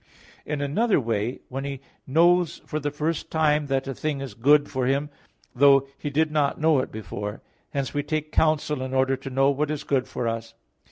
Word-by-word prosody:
In 150 -1 -2
another 195 +11 +2
way 115 -1 -2
when 135 +2 -5
he 140 -1 -4 0.3
knows 170 +4 +3
for 155 - -3
the 145 0 -2
first 150 +3 -2
time 150 -2 +2
that 135 0 -1
a 135 - -2
thing 150 +2 -2
is 135 -5 -6
good 145 +6 +4
for 130 -3 -2
him, 140 +2 0 0.4
though 135 +1 +5
he 145 - -5
did 155 +2 +1
not 145 -2 +1
know 155 -2 +4
it - - -3
before; 105 0 -6 0.3
hence 140 -2 -3
we 145 - 0
take 155 +1 -3
counsel 150 -3 +1
in 130 0 -3
order 130 0 +3
to 135 - -7
know 135 +1 +3
what 145 +2 -1
is 150 -1 -3
good 130 -2 0
for 120 - -3
us. 115 0 -4
140 Hz, 205 wpm, -25 LUFS, 130-150 Hz, 0.4 s, though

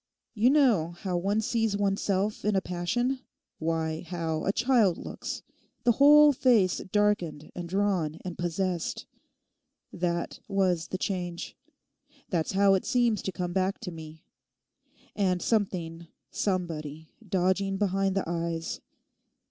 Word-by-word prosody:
'You 225 +3 +3
know 235 - +3
how 185 -3 -2
one 200 +5 +1
sees 225 -2 0
oneself 200 0 0
in 210 -1 +1
a - - +4
passion—why, 175 - -3
how 165 -3 -2
a 195 - +3
child 230 -5 +3
looks—the 245 - -4
whole 295 +4 +7
face 230 -8 +3
darkened 195 -8 0
and 175 -1 -6
drawn 185 -5 0
and 180 -2 -4
possessed? 175 0 -2 0.9
That 170 -1 -2
was 185 -5 +1
the 185 - -3
change. 175 -3 -4 0.8
That's 170 -2 0
how 195 0 +5
it 190 - +1
seems 240 -4 +2
to 190 - -3
come 180 -1 -4
back 190 +1 0
to 190 -6 -5
me. 160 -1 -11 0.9
And 185 -3 +1
something, 175 -6 -1 0.2
somebody, 160 -5 -3 0.2
dodging 190 +2 +1
behind 195 -1 +1
the 195 - -1
eyes. 170 -1 -3
190 Hz, 125 wpm, -28 LUFS, 170-210 Hz, 0.9 s, whole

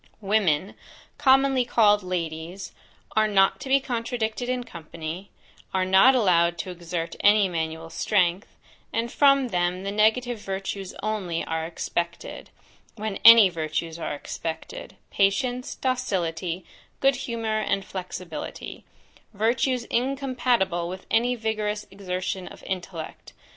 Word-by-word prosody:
Women, 195 -4 +1 0.5
commonly 270 -2 +4
called 210 -3 +4
Ladies, 175 0 -4 0.4
are 215 0 +4
not 195 -2 +3
to 270 - -7
be 275 +1 +5
contradicted 240 -1 -3
in 250 -1 -1
company, 170 -2 -8 0.5
are 185 0 +2
not 190 +8 +6
allowed 175 -7 +3
to 180 +2 -5
exert 170 -1 -5
any 205 -1 +5
manual 165 -1 -4
strength; 185 -1 +1 0.4
and 230 +1 -2
from 275 -3 +4
them 180 -1 -1
the 200 - -3
negative 220 +3 +2
virtues 195 -1 -5
only 195 -6 -2
are 160 0 -2
expected, 170 0 -4 0.5
when 215 -2 -4
any 230 -3 +10
virtues 165 -1 -3
are 155 - -3
expected, 160 +2 -6 0.2
patience, 245 +6 0
docility, 185 -9 -2 0.3
good 275 -1 +3
humour, 230 -4 -2
and 195 -2 -1
flexibility; 180 -4 -7 0.5
virtues 235 +4 +1
incompatible 250 -9 0
with 185 +1 -7
any 245 +2 +2
vigorous 215 -2 -2
exertion 185 -1 -4
of - - -12
intellect. 180 -3 -6
195 Hz, 120 wpm, -25 LUFS, 175-235 Hz, 0.5 s, any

